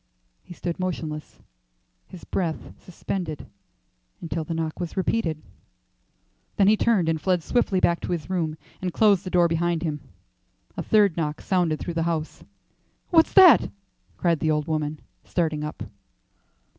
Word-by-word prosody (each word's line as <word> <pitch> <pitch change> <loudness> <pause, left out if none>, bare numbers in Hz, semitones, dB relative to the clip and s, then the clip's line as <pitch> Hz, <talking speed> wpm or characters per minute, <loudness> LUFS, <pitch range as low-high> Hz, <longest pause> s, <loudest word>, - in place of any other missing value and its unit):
He 175 - -12
stood 170 0 -4
motionless, 160 -4 -4 0.7
his 180 - -12
breath 170 -4 -3
suspended 175 -3 -5 0.7
until 165 -1 -4
the 165 +2 -4
knock 160 -1 -3
was 175 +1 -5
repeated. 180 -5 -1 1.1
Then 195 - +4
he 215 - +6
turned 210 -6 +2
and 160 -1 0
fled 180 -1 +1
swiftly 200 -4 +1
back 170 -1 +2
to - - -4
his 165 -5 -3
room, 165 -4 -2 0.2
and 185 -1 -2
closed 200 -1 +3
the 185 - -5
door 175 -1 +4
behind 170 0 0
him. 150 -3 -3 0.7
A - - -3
third 205 -6 +3
knock 155 -2 -2
sounded 175 -5 0
through 175 - -4
the 165 - -1
house. 160 -2 -4 0.7
"What's 325 -2 +4
that?" 360 - +8 0.5
cried 170 -3 +1
the 155 - 0
old 150 -1 +1
woman, 155 -1 -2 0.2
starting 155 -4 -1
up. 150 +1 -5
170 Hz, 150 wpm, -24 LUFS, 155-185 Hz, 1.1 s, that